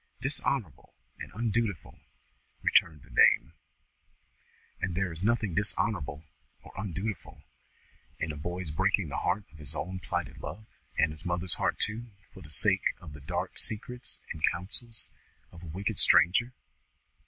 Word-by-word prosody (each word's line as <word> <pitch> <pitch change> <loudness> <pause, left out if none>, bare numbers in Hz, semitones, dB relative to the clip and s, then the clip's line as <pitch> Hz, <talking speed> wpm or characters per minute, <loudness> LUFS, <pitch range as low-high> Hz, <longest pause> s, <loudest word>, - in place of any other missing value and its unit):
"Dishonourable 130 - -1 0.2
and - - -7
undutiful?" 115 -4 -1 0.6
returned 80 -4 +4
the - - -18
dame. - - +5 1.3
"And 95 -1 -1
is - - -5
there 95 -2 0
nothing 110 -5 +1
dishonourable 85 -6 0 0.4
or - - -13
undutiful 95 +1 -4 0.7
in 80 - -2
the - - -6
boy's 85 +2 -4
breaking 75 - +2
the - - -3
heart 100 +4 0
of 80 - -15
his 75 0 -1
own 95 +5 -3
plighted - - -3
love, 110 +2 -7 0.3
and 80 - +4
his 80 +1 -11
mother's 90 -1 0
heart - - 0
too, 115 +3 -1 0.3
for 95 - -12
the 75 - -12
sake 75 - +4
of 75 - -10
the 75 - -10
dark 85 +3 -3
secrets 125 +3 -1
and 80 - -10
counsels 110 +6 -2 0.4
of 85 - -12
a 85 - -9
wicked 95 +5 -2
stranger? 120 +8 +5
90 Hz, 145 wpm, -30 LUFS, 80-110 Hz, 1.3 s, dame